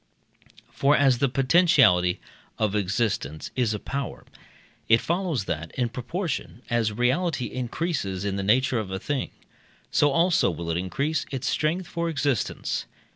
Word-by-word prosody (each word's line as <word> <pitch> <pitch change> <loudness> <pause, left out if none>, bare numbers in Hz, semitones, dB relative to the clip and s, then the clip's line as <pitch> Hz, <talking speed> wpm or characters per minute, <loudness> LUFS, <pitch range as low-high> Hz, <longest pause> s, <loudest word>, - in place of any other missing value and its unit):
For, 140 +2 +3
as 135 -4 +4
the 140 - +2
potentiality 130 - +4 0.4
of 105 -2 0
existence 100 - -1
is 120 -4 +1
a - - -5
power, 140 +3 -5 0.6
it 115 0 +6
follows 170 - -1
that, 80 -1 -3
in 125 -2 0
proportion 130 - -4
as 115 -2 +2
reality 125 - 0
increases 125 - -2
in 100 -1 -1
the 100 - -2
nature 120 +5 +2
of 105 -3 -4
a 95 - -3
thing, 135 +7 -2 0.6
so 145 - +4
also 170 +3 +3
will 85 -1 -4
it 80 - 0
increase 140 - -1
its 135 -2 -3
strength 165 +7 0
for 170 -1 -2
existence. 145 -6 -1
125 Hz, 145 wpm, -25 LUFS, 105-150 Hz, 0.6 s, it